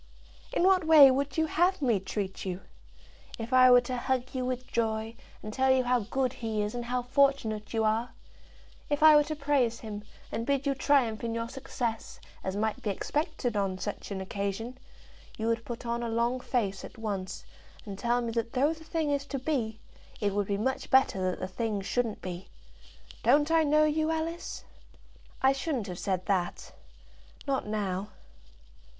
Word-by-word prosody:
"In - - +1
what 375 -1 +5
way 305 -4 +9
would 275 +2 -1
you 320 - +3
have 350 +4 +2
me 240 -8 +2
treat 190 0 -4
you? 185 0 -4 0.8
If 230 +3 -5
I 255 0 +8
were 245 0 +8
to 250 +1 -4
hug 255 0 -1
you 255 -1 -2
with 255 0 -3
joy, 225 -1 -1 0.3
and 215 0 -6
tell 265 +2 +2
you 260 -1 +4
how 250 0 +2
good 260 -1 0
he 220 -4 -2
is, 210 - -3
and 240 -1 -4
how 250 +1 -1
fortunate 245 -5 +1
you 225 -1 0
are, 220 +3 +1 0.8
if 290 +1 0
I 310 -1 +9
were 295 - +6
to 310 - -3
praise 280 -5 +1
him, 210 -2 -6 0.3
and 230 - -2
bid 280 0 +1
you 280 - +2
triumph 260 -5 +2
in 230 -1 -2
your 230 0 -2
success, 235 -3 -4 0.2
as 190 0 -3
might 215 +1 -1
be 210 - -2
expected 250 - -2
on 195 -2 0
such 205 +2 -5
an 195 -2 -4
occasion, 200 +5 -3 0.6
you 220 - -3
would 230 0 0
put 240 0 -6
on 235 0 -1
a 235 - -2
long 235 +3 0
face 205 -7 -1
at - - -10
once, 200 -4 -4 0.4
and 200 -2 -7
tell 240 +1 +1
me 235 -1 -2
that 230 0 -2
though 285 +5 +2
the 320 0 -13
thing 315 -2 -1
is 280 0 -1
to 275 - -3
be, 245 -6 -2 0.4
it 205 -2 0
would 205 -1 0
be 200 - 0
much 260 +6 -2
better 195 -8 +3
that 180 - -4
the 185 - -3
thing 215 +2 -2
shouldn't 225 +3 -2
be. 180 0 -6 0.7
Don't 295 +2 +4
I 325 0 +5
know 305 0 +4
you, 310 +1 +1
Alice?" 325 +1 -3 0.8
"I 265 +1 +6
shouldn't 270 -5 -2
have 180 -3 -6
said 185 -2 -1
that; 185 -3 -1 0.7
not 270 -6 -1
now." 200 -2 -2
240 Hz, 190 wpm, -29 LUFS, 210-275 Hz, 0.8 s, way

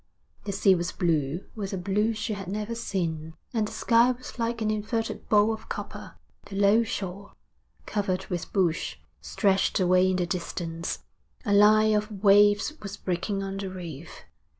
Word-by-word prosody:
The 205 - -2
sea 195 0 +4
was 175 0 -1
blue 160 -1 0
with 200 -3 -5
a - - -1
blue 205 +5 +1
she 215 +1 -2
had 195 -3 -6
never 210 +4 -3
seen, 165 -8 -3 0.2
and 220 -3 +1
the - - -8
sky 235 +1 +4
was 250 0 -11
like 230 0 -1
an 215 -1 0
inverted 220 +2 -3
bowl 210 +1 +4
of 220 - -9
copper. - - -7 0.3
The 195 - -8
low 200 +3 +5
shore, 200 -2 -5 0.5
covered 195 -3 -1
with 175 -2 -4
bush, 175 -5 0 0.3
stretched 195 -2 +1
away 185 0 +4
in 185 - +1
the 180 -1 0
distance; 170 -1 -4 0.4
a 205 - +1
line 215 +1 +6
of 210 +1 0
waves 205 +6 +5
was 200 -1 -6
breaking 190 +2 -2
on 195 0 -4
the 195 -1 -4
reef. 170 -4 -8
200 Hz, 170 wpm, -27 LUFS, 180-215 Hz, 0.5 s, line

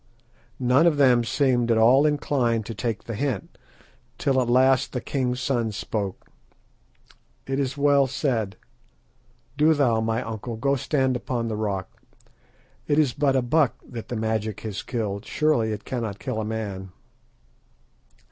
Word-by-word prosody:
None 130 +6 +4
of 155 -4 +2
them 125 -4 +5
seemed 120 -1 +1
at 115 - +3
all 130 +6 +5
inclined 125 -6 0
to 115 - -5
take 110 +1 -3
the 115 - -6
hint, 120 -2 -3 0.6
till 135 -2 +2
at 120 - -1
last 130 +1 +3
the 125 - -1
king's 125 -1 -2
son 120 -4 0
spoke. 100 -2 -4 1.2
"It 135 +1 -2
is 140 0 -2
well 140 -1 +4
said. 120 -7 -1 1.0
Do 155 +2 +4
thou, 120 -6 +2
my 115 +2 -1
uncle, 115 +1 -5
go 140 +5 +1
stand 130 -1 0
upon 120 -1 -2
the 110 - -2
rock. 100 -3 -4 0.9
It 145 - +2
is 145 -6 +3
but 140 -1 +1
a 130 - +2
buck 145 +1 +2
that 115 -3 -8
the 120 - -3
magic 110 -1 -2
has 105 -3 -4
killed. 105 -5 -3
Surely 130 -5 +1
it 105 0 -5
cannot 115 -6 -3
kill 110 +2 -3
a - - -3
man." 100 -4 -5
120 Hz, 155 wpm, -24 LUFS, 110-135 Hz, 1.2 s, them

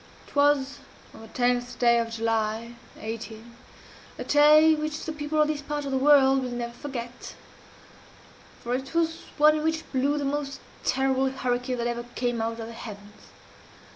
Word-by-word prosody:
It - - -18
was 285 -1 +2 0.3
on - - -12
the 225 - -11
tenth 245 +1 -1
of 235 -1 +4
July, 225 0 -1 0.3
18, 225 +1 -7 0.6
a - - -4
day 305 +2 +6
which 305 0 -3
the 320 - -3
people 300 0 -2
of 305 - +5
this 305 -1 -2
part 295 0 -4
of 275 - -4
the 265 - +1
world 270 -1 +5
will 255 - -3
never 240 -1 -4
forget 245 -2 -7 1.3
for 240 0 -2
it 265 +5 -4
was 325 -1 0
one 305 +1 +6
in 305 - -3
which 320 0 -1
blew 280 +2 +1
the 285 - -2
most 275 -1 -3 0.2
terrible 265 0 +1
hurricane 250 -1 -2
that 235 - -2
ever 240 0 -2
came 240 -2 -1
out 225 +1 -3
of 225 - -5
the 230 - -9
heavens. 205 -2 -11
260 Hz, 170 wpm, -26 LUFS, 235-290 Hz, 1.3 s, day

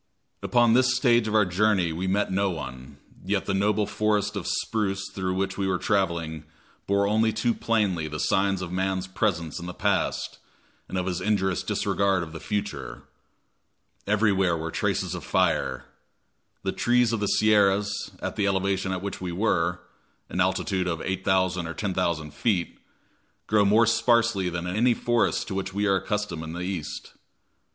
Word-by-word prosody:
Upon 120 -2 +3
this 130 +1 +4
stage 120 -3 +3
of 110 - -1
our 105 -1 +5
journey 90 -2 +2
we 90 +4 -3
met 100 +2 +1
no 100 +1 +1
one, 70 -4 -7 0.3
yet 95 +1 -1
the 100 - -1
noble 105 +2 +2
forest 105 0 0
of 100 - -4
spruce 100 -3 -1
through 95 -1 -2
which 95 +1 -2
we 95 - 0
were 95 -1 +1
traveling 85 -6 -1 0.4
bore 100 0 +2
only 110 +2 +2
too 110 +2 0
plainly 100 -10 0
the 75 0 -5
signs 95 +1 +1
of 85 - -6
man's 95 0 -1
presence 95 -4 -1
in 85 - -7
the 90 - -7
past, - - -1 0.5
and 95 - -3
of 90 - -1
his 90 -1 -2
injurious 95 -3 +1
disregard 95 -2 0
of 80 -1 -9
the 80 - -6
future. 105 +3 -4 1.0
Everywhere 100 -4 +2
were 80 0 -4
the - - -10
traces - - -1
of - - -5
fire. 65 0 0 0.8
The - - 0
trees 120 -1 +2
of 115 - 0
the 105 - 0
Sierras, 105 -1 +2
at - - -3
the 100 - +1
elevation 95 -1 0
at 95 0 -3
which 100 - -5
we 90 -1 -3
were, 90 -2 0 0.5
an 90 - -1
altitude 95 0 0
of 85 -2 -2
8,000 95 -2 0
or 85 - -6
10,000 85 -6 -2
feet, 90 +2 -1 0.7
grow 105 -1 +3
more 105 +3 +5
sparsely 115 -4 +2
than 85 0 -4
in 90 +1 -3
any 120 +2 +3
forest 120 0 +1
to - - -3
which 95 0 -4
we 100 +1 +1
are 100 -1 +3
accustomed 105 -4 -3
in 80 0 -6
the 90 - -5
East. 90 -4 -5
95 Hz, 175 wpm, -26 LUFS, 90-105 Hz, 1.0 s, our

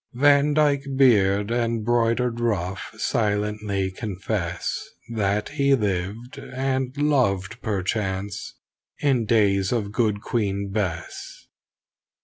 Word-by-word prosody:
Van 145 +2 +4
Dyke 145 -2 +2
beard 105 -5 +4
and 115 -2 0
broidered 120 0 +1
ruff 95 -5 -1
silently 105 -2 -1
confess 95 -3 -3 0.3
That 105 -1 0
he 140 0 +3
lived 105 +2 -3
and 130 0 -2
loved 115 -8 +1
perchance 100 -1 -2 0.4
in 130 -5 +1
days 100 -4 +3
of 105 -5 -1
Good 105 -2 +1
Queen 100 -4 -1
Bess. 90 -5 -4
110 Hz, 100 wpm, -24 LUFS, 100-125 Hz, 0.4 s, Van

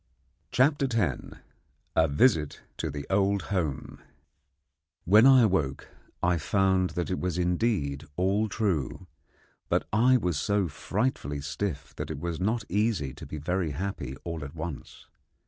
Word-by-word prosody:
CHAPTER 140 +1 +3
X 95 - +1 0.7
A 80 - +4
VISIT 75 - +2
TO - - -3
THE 70 0 -5
OLD 100 0 +2
HOME 80 -8 -2 1.1
When 105 +8 +7
I 130 -2 +7
awoke 80 -10 0 0.3
I 90 -1 +2
found 95 +2 +2
that 90 +1 -1
it 90 - -1
was 90 -1 -2
indeed 90 -5 0
all 100 +4 +1
true, 95 - -1 0.6
but - - +1
I 125 +4 +5
was 90 -9 -1
so 100 +1 +1
frightfully 80 - -2
stiff 75 -3 -4
that - - -4
it - - -4
was 85 -2 -3
not 110 +4 0
easy 100 - 0
to 80 +3 -10
be 75 - -6
very 85 +1 -1
happy 90 -5 -4
all 85 -3 -4
at 70 +2 -8
once. 80 -2 -7
90 Hz, 145 wpm, -28 LUFS, 75-105 Hz, 1.1 s, When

